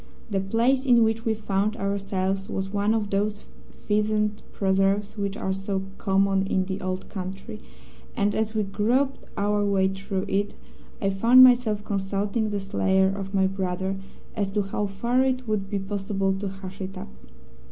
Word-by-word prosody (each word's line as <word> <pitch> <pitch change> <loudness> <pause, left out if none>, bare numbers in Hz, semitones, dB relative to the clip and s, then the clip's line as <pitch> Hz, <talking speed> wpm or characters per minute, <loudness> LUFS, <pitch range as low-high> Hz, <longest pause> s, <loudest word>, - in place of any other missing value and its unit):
The 195 - +1
place 230 +7 +2
in 240 -4 +5
which 225 +1 0
we 225 -1 +2
found 210 0 -1
ourselves 195 -1 -2
was 190 0 -3
one 205 +2 +2
of 210 -2 -2
those 205 +1 -1 0.3
pheasant 210 0 0
preserves 195 +1 +1
which 200 -1 -3
are 190 - -1
so 195 0 -2 0.2
common 195 -1 +2
in 190 -1 +1
the 190 0 -4
Old 185 0 -3
Country, 195 +3 -7 0.6
and 205 -2 +2
as 220 +1 -1
we 215 - +2
groped 240 +8 0
our 205 0 +1
way 195 -2 +2
through 195 0 -3
it 200 +1 -1 0.4
I 195 - +1
found 235 +6 +7
myself 240 -5 +4
consulting 200 +2 -1
the 205 -1 -2
slayer 190 -1 +2
of 195 0 -4
my 190 -1 +4
brother 190 0 -2 0.4
as 200 -3 0
to 205 -1 +1
how 205 +1 -2
far 235 +6 +1
it 255 -1 -1
would 205 -3 -1
be 205 - -1
possible 195 0 -1
to 195 +1 -3
hush 190 0 -8
it 190 0 -5
up. 195 +2 -7
200 Hz, 170 wpm, -25 LUFS, 195-215 Hz, 0.6 s, found